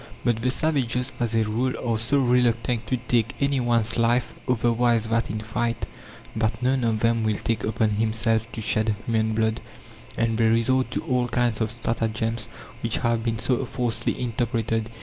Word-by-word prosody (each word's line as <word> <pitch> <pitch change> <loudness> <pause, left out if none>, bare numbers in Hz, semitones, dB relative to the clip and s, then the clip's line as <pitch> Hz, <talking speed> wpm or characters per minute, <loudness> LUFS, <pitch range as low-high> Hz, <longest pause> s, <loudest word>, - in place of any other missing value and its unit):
But 115 -2 +1
the 125 - +1
savages, 130 -4 0
as 120 -2 0
a 110 - +3
rule, 120 +5 0
are 115 - +2
so 115 +6 +1
reluctant 120 -3 +2
to 130 - 0
take 120 -2 0
any 140 -1 +1
one's 115 -2 +1
life 120 +1 +2 0.2
otherwise 120 -1 +2
than 115 +1 +2
in 110 +2 -3
fight, 115 +1 -2 0.5
that 110 +2 -1
none 130 0 +2
of 110 -2 0
them 115 0 +2
will 110 -1 +1
take 115 - -2
upon 110 0 +1
himself 115 +1 0
to 115 - -4
shed 110 0 +1
human 110 -1 +1
blood, 110 0 0 0.6
and 115 -1 0
they 115 - +4
resort 125 +3 +2
to - - -3
all 125 -5 +1
kinds 120 -2 0
of 110 - +1
stratagems, 115 0 -2 0.3
which 115 0 0
have 115 -2 +1
been 115 -1 -1
so 125 +3 0
falsely 120 -2 -1
interpreted. 115 -2 -1
115 Hz, 175 wpm, -25 LUFS, 110-120 Hz, 0.6 s, they